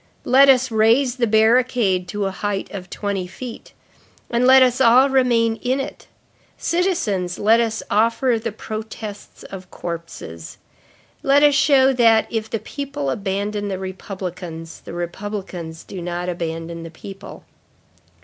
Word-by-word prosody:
Let 270 +2 +6
us 260 -1 +4
raise 235 +4 +3
the 240 -2 +1
barricade 220 -4 +3
to 205 +2 -3
a 195 - -1
height 200 +1 -3
of 190 -3 -7
twenty 200 -3 -3
feet, 230 +6 -9 0.6
and 240 +1 +2
let 260 0 +8
us 255 +1 +1
all 260 +3 +6
remain 235 -4 +2
in 255 +4 -1
it. 270 - -6 0.5
Citizens, 315 - -1
let 220 +3 +4
us 225 -2 -1
offer 230 +2 +2
the 230 - -2
protests 215 -1 -8
of 185 -2 -10
corpses. 165 - -7 0.6
Let 280 +2 +4
us 295 -1 +6
show 275 -1 +4
that, 230 -3 +4
if 220 -1 -3
the 225 - -1
people 220 - -4
abandon 205 +3 -2
the 195 -2 -3
republicans, 180 -3 -7
the - - -10
republicans 175 -2 -6
do 185 - -8
not 175 +1 -3
abandon 165 -1 -4
the 165 - -8
people." 195 +4 -11
215 Hz, 140 wpm, -21 LUFS, 185-250 Hz, 0.6 s, let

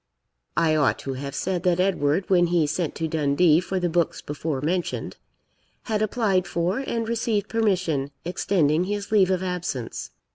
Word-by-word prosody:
I 160 -2 +3
ought 150 -3 +2
to 135 - -2
have 140 +2 -6
said 185 -2 -1
that 180 -1 +1
Edward, 180 -2 +1
when 175 -2 +4
he 170 -2 +2
sent 160 +1 -2
to 165 - -2
Dundee 155 +1 +3
for 185 +1 -2
the 175 - 0
books 170 -1 0
before 145 -1 -3
mentioned, 170 +5 -2 0.7
had 215 -2 -1
applied 200 -4 +1
for, 175 +6 -1
and 230 -4 -2
received 225 -3 0
permission, 185 -11 0 0.2
extending 170 -2 +1
his 205 +1 -4
leave 195 -4 +4
of 185 -1 0
absence. 180 -10 -4
175 Hz, 160 wpm, -24 LUFS, 155-195 Hz, 0.7 s, when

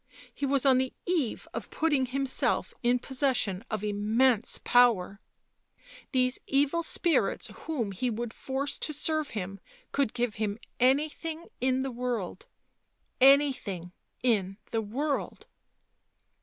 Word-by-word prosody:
He 280 - -2
was 275 0 +2
on 260 -2 +6
the 260 0 -1
eve 325 -10 -1
of - - -5
putting 290 -5 +1
himself 270 +1 0
in 245 +1 +3
possession 250 -7 -1
of 215 -2 -3
immense 215 +3 +2
power; 220 -5 +4 0.9
these 255 -1 +2
evil 285 +4 +2
spirits 335 0 +1
whom 250 -11 -2
he 245 +7 -1
would 235 0 -4
force 275 +1 -3
to 305 - -2
serve 310 0 0
him 195 0 -4 0.3
could 275 -5 0
give 240 -3 -1
him 210 -1 -1 0.2
anything 310 +5 +1
in 260 +1 +1
the 270 - -3
world 235 -7 -3 0.4
— - - -45 0.2
anything 195 -11 -4 0.3
in 195 -6 +1
the 225 - 0
world 275 +8 -3
255 Hz, 130 wpm, -29 LUFS, 215-280 Hz, 0.9 s, on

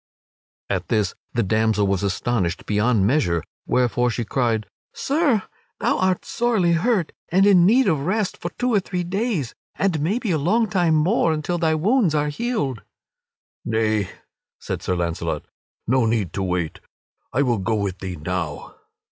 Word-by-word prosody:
At - - -2
this 105 -4 +1 0.2
the 115 - +1
damsel 110 0 +2
was 95 -2 0
astonished 100 -2 -1
beyond 105 0 +2
measure, 100 - +1 0.2
wherefore 125 -1 +2
she 120 0 -2
cried: 115 -3 0 0.3
"Sir, 280 - +1 0.4
thou - - +1
art 185 -1 +1
sorely 225 -8 +1
hurt, 180 0 +1 0.2
and 190 +3 +4
in 185 -4 +6
need 250 +4 +4
of 160 -6 +2
rest 205 0 0
for 175 - -4
two 245 -1 0
or 205 - +5
three 180 -1 -3
days, 185 - -2 0.2
and 180 -6 0
maybe 205 +6 0
a 160 - +1
long 220 +10 +2
time 175 -5 +2
more, 165 +3 +2
until 155 +3 -2
thy 160 -2 +2
wounds 195 - +2
are 150 0 +1
healed." 145 - -2 0.8
"Nay," 110 -3 0 0.5
said - - -5
Sir 90 - -1
Launcelot, 85 -1 -2 0.4
"no 125 -1 +2
need 110 -6 0
to 100 - -2
wait; 90 -4 -2 0.5
I 135 +4 +2
will 120 -5 +1
go 110 +4 0
with 100 -3 -2
thee 95 -1 -5
now." 85 -2 -4
140 Hz, 160 wpm, -22 LUFS, -, 0.8 s, in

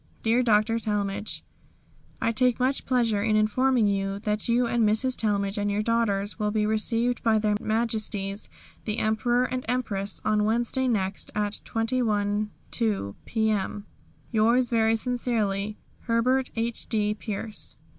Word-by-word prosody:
"Dear 230 +2 +3
Dr. 225 -1 +3
Talmage 205 -1 -2 0.8
"I 230 - +1
take 250 +1 +2
much 260 +2 0
pleasure 230 -5 +2
in 215 0 +2
informing 235 +3 +3
you 195 -1 0
that 210 +1 -1
you 240 +1 +3
and 235 -1 +1
Mrs. 220 +5 +2
Talmage 200 -1 0
and 205 0 0
your 205 +1 0
daughters 210 -3 0
will 210 -1 +1
be 210 0 +1
received 230 +3 +1
by 225 -1 +3
Their 210 -1 +1
Majesties 215 -3 -1 0.4
the 215 0 -2
Emperor 240 +3 +1
and 255 0 -2
Empress 210 -5 -2
on 215 -1 +2
Wednesday 240 +4 +1
next, 195 -5 -1
at 210 0 -1
2½ 215 - -1
p.m. 215 -2 -1 0.5
"Yours 235 +3 +3
very 225 -1 +3
sincerely, 220 -4 -1 0.3
"HERBERT 250 +3 +2
H.D. 225 -2 -1
PIERCE. 215 0 -4
220 Hz, 135 wpm, -26 LUFS, 210-235 Hz, 0.8 s, Dear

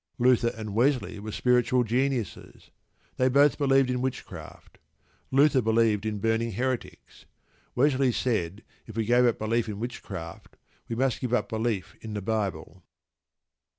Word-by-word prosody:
Luther 120 -1 +3
and 110 -2 -6
Wesley 120 -2 +1
were 110 +1 -6
spiritual 125 +2 +2
geniuses. 125 -1 -2 0.5
They 130 0 +3
both 140 +3 +4
believed 135 -2 +3
in 125 0 -1
witchcraft. 130 0 -7 0.5
Luther 135 0 +4
believed 110 -2 +2
in 105 -1 -2
burning 115 +2 0
heretics. 130 +3 -4 0.5
Wesley 135 0 +3
said 110 -5 -2 0.2
if 110 -1 -9
we 110 - 0
gave 120 +2 +4
up 120 - +1
belief 115 +1 -1
in 105 -1 -5
witchcraft 95 -8 -7 0.3
we 115 - -2
must 130 +1 0
give 125 -2 0
up - - -1
belief 110 -4 -2
in 110 -1 -7
the 105 - -3
Bible. 100 -3 -3
120 Hz, 145 wpm, -27 LUFS, 110-130 Hz, 0.5 s, both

